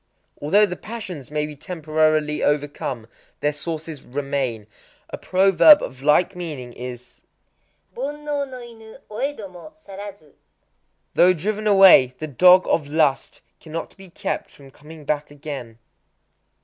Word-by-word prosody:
Although 200 +9 +4
the 180 - -5
passions 190 - -8
may 150 0 -1
be 150 0 -8
temporarily 155 -2 0
overcome, 145 -5 -2 0.4
their 150 0 +1
sources 155 0 -6
remain. 135 -5 -3 0.5
A - - -5
proverb 195 - +5
of 130 0 -7
like 150 +6 +3
meaning 150 -9 -7
is, 125 0 -9 0.7
Bonnō 290 +4 -5 0.2
no 255 - -8
inu 230 -2 -13
oëdomo 215 - -6
sarazu: 200 - -11 0.8
"Though 180 +1 +5
driven 210 +5 -3
away, 190 -11 +7
the 155 - -5
Dog 180 +6 +6
of 150 -3 0
Lust 150 -2 0 0.2
cannot 165 +1 -7
be 195 -1 -14
kept - - -4
from 135 -1 -17
coming 150 +2 -14
back 150 0 -2
again." 140 -6 -8
155 Hz, 125 wpm, -22 LUFS, 145-195 Hz, 0.8 s, away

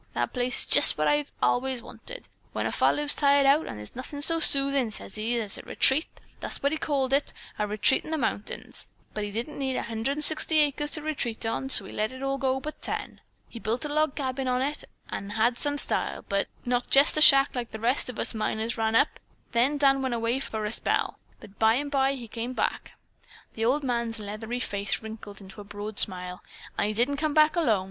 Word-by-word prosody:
That - - -1
place 250 -1 +1
is - - +1
jest - - +6
what - - +1
I've 295 -1 +1
allays 255 -1 +1
wanted. - - -9 0.3
When - - -2
a - - -1
fellow's 295 0 +2
tired 280 -1 +3
out, 285 +3 +4
there's 105 -1 -8
nothin' 285 +3 -4
so 330 +1 +3
soothin',' 275 -4 +3
sez 210 -2 -7
he, 230 +3 -1
'as 210 -3 -2
a - - -7
retreat,' 285 +5 +4 0.3
that's - - -4
what 280 - +2
he 315 - -2
called 270 -4 -1
it, 280 +1 +1 0.3
'a 210 - 0
retreat 210 +5 +3
in - - -9
the 320 - -1
mountains.' 225 -6 -2 0.3
But 210 -1 -3
he - - -5
didn't 235 +9 -5
need 265 -2 -1
160 290 +8 +1
acres 295 0 +2
to 305 0 -3
retreat 245 -8 -2
on, 245 +4 -2
so 220 -6 +3
he - - -10
let 220 +5 -3
go 270 0 -2
all 265 - -1
but 305 +3 -8
ten. - - -5 0.3
He'd 230 - -10
built 230 +6 -1
a - - -4
log 305 -2 +1
cabin 265 -2 -3
on 250 0 +1
it 290 +2 -3 0.3
that 200 - -5
had 235 +3 +1
some 290 0 -1
style, - - -1 0.4
not 245 0 -1
jest 280 +3 +5
a - - +2
shack 275 -2 +8
like 245 -2 -4
the 220 - -8
rest 245 +4 0
of 250 - -7
us - - -1
miners 220 +1 -2
run 220 0 +1
up, 280 - +2 0.3
then 255 +5 +2
Dan 275 -1 +3
went 260 -2 -1
away 230 +3 0
for 220 -5 -4
a 210 - -2
spell - - -1 0.2
but 195 - -15
by 220 0 +4
and 285 +2 -2
by 270 -1 +2
he 245 -4 -8
come 235 +3 -5
back." - - -2 0.6
The 225 - -2
old 280 +5 +1
man's 235 -3 -2
leathery 220 +3 -5
face 200 -2 -3
wrinkled 215 -2 -9
into 195 +2 -11
a - - -9
broad 205 +1 -6
smile. 180 -1 -1 0.3
"An' - - 0
he 215 - -2
didn't 245 +6 +1
come 305 0 -1
back 310 +1 +5
alone! 240 - +2
250 Hz, 215 wpm, -27 LUFS, 220-285 Hz, 0.6 s, shack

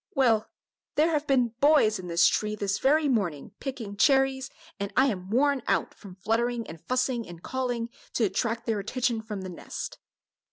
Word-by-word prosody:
"Well, 235 -6 +3 0.5
there 315 +3 +3
have 300 -1 0
been 250 -3 +3
boys 280 -8 +4
in 180 - -7
this 170 -1 +4
tree 210 0 +2
this 200 -1 -1
very 300 +3 +3
morning, 190 - -1
picking 235 -7 -5
cherries, 270 +2 +3 0.3
and 200 +1 -3
I 265 - +6
am 190 -8 -2
worn 275 +4 +2
out - - +1
with 190 -2 -11
fluttering 230 +4 0
and 160 -3 -10
fussing 255 -2 -1
and 175 -1 -11
calling, 245 -3 -2 0.3
to 235 - +1
attract 220 +3 -1
their 225 -3 0
attention 235 +2 -1
from 210 -3 -6
the 185 - -6
nest." 175 - -7
230 Hz, 175 wpm, -27 LUFS, 200-265 Hz, 0.5 s, I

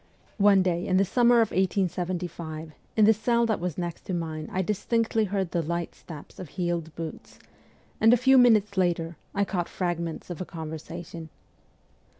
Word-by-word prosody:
One 200 -2 +6
day 175 -1 -1
in 185 - +2
the 195 - +4
summer 240 +3 +4
of 225 - +1
1875, 175 -4 -2 0.3
in 215 - +6
the 220 - +7
cell 235 +2 +1
that 220 -2 0
was 175 -3 -3
next 175 -2 -4
to 185 - -2
mine 160 -2 -4
I 190 - 0
distinctly 220 +3 0
heard 190 -3 -2
the 170 - 0
light 170 +1 -3
steps 155 -4 -12
of 180 -5 -7
heeled 170 -2 -3
boots, 165 -1 -8 0.6
and 225 - +6
a 245 - +6
few 265 +2 +5
minutes 215 -5 +4
later 170 -2 0 0.2
I 200 0 +2
caught 180 -4 -2
fragments 170 -1 -3
of 175 - -6
a - - 0
conversation. 160 0 -7
180 Hz, 170 wpm, -27 LUFS, 170-205 Hz, 0.6 s, the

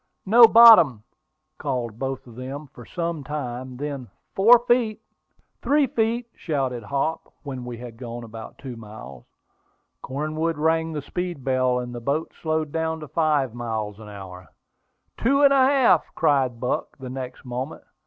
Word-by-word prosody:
"No 230 +4 +8
bottom!" 220 - +8 0.6
called 120 -6 -3
both 135 -1 -4
of 120 - -13
them, 135 +4 -7
for 120 - -13
some 170 -4 -3
time; 130 -3 -5
then, 140 -3 -5 0.2
"Four 225 +6 +7
feet." 230 -3 +2 0.6
"Three 290 0 +3
feet!" 235 0 -1
shouted 135 -6 -2
Hop, 140 +8 -3
when 130 -4 -6
we 120 -1 -6
had 120 -1 -10
gone 120 -1 -7
about 115 -1 -10
two 130 -3 -8
miles. 105 - -11 0.8
Cornwood 155 +4 -2
rang 160 +1 +1
the 150 -2 -4
speed 175 -5 -5
bell, 130 -1 +1
and 125 0 -5
the 120 - -6
boat 140 +6 -2
slowed 155 -2 -1
down 160 0 -2
to 150 - -7
five 150 -6 +1
miles 110 -3 -4
an 110 -1 -11
hour. 95 -3 -10 0.7
"Two 270 +4 +2
feet 285 - +3
and 280 -1 +7
a 265 -1 +5
half!" 265 - +4
cried 130 -5 +1
Buck, 125 - -3
the 130 -2 -8
next 130 0 -7
moment. 125 +4 -5
135 Hz, 160 wpm, -24 LUFS, 120-165 Hz, 0.8 s, No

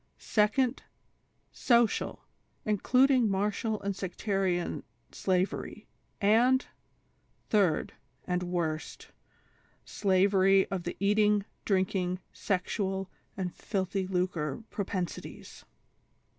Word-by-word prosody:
" - - -44 0.2
*Seco«ci!,— 235 +4 +2 0.7
Social— 235 -2 +1 0.4
including 250 +3 +3
Marital 210 +2 -1
and 200 -1 -2
Sectarian 190 -1 -1 0.3
Sla 185 0 +1
very; - - -8 0.3
and 240 +6 +4 0.4
" - - -41
Third, 195 -7 +2 0.2
— - - -38
and 180 -1 -1
worst. 170 -3 -3 0.8
Slavery 195 0 +3
to 195 - -1
the 175 0 -6
Eating, 210 0 +3 0.2
Drinking, 185 -2 +1 0.2
Sexual 190 0 -2 0.3
and 180 -2 -3
Filthy 190 -1 -2
Lucre 180 -1 -2
Propensities. 185 -3 -5
195 Hz, 90 wpm, -30 LUFS, 185-210 Hz, 0.8 s, and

